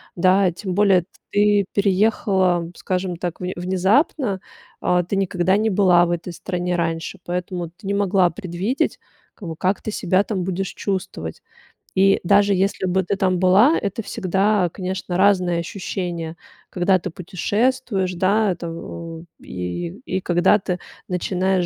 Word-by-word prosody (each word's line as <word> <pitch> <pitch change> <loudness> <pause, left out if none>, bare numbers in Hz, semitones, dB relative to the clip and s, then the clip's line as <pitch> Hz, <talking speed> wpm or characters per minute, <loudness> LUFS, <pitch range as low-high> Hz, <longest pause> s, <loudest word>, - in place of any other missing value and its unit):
Да, 185 +1 +4
тем 185 +1 -5
более 195 -3 +4
т - - -31 0.2
ты 205 -1 +3
переехала, 190 -3 +2
скажем 185 -2 -2
так, 175 -1 -4
вн 180 0 -2
внезапно. 190 - +1 0.4
А, 180 0 +2
ты 195 - -3
никогда 190 0 +1
не 220 +1 +1
была 185 -3 +4
в - - -2
этой 175 +1 -3
стране 180 0 -2
раньше, 165 +2 -2
поэтому 175 -1 -3
ты 180 +4 -19
не 200 - 0
могла 195 -3 +3
предвидеть, 190 +6 -2 0.4
как 195 - -9
бы, 160 - -5
как 190 +2 0
ты 215 - -3
себя 190 0 +1
там 195 -5 -2
будешь 190 +1 -3
чувствовать. 180 - -4 0.5
И 195 +1 +4
даже 200 +2 +4
если 195 0 0
бы 185 +1 +2
ты 200 - -1
там 185 -2 +1
была, 200 - +5
это 200 +2 -3
всегда, 190 0 +1
конечно, 185 -1 -4
разные 185 -3 +3
ощущения, 175 -3 -4 0.3
когда 185 +1 +2
ты 185 - -5
путешествуешь, 195 +2 -1
да, 195 +3 +2
это 170 -1 -5
в 165 0 -7 0.2
и, 90 - -4 0.2
и 185 - -1
когда 175 +4 +3
ты 180 -1 -2 0.3
начинаешь 185 0 0
185 Hz, 150 wpm, -21 LUFS, 175-200 Hz, 0.5 s, была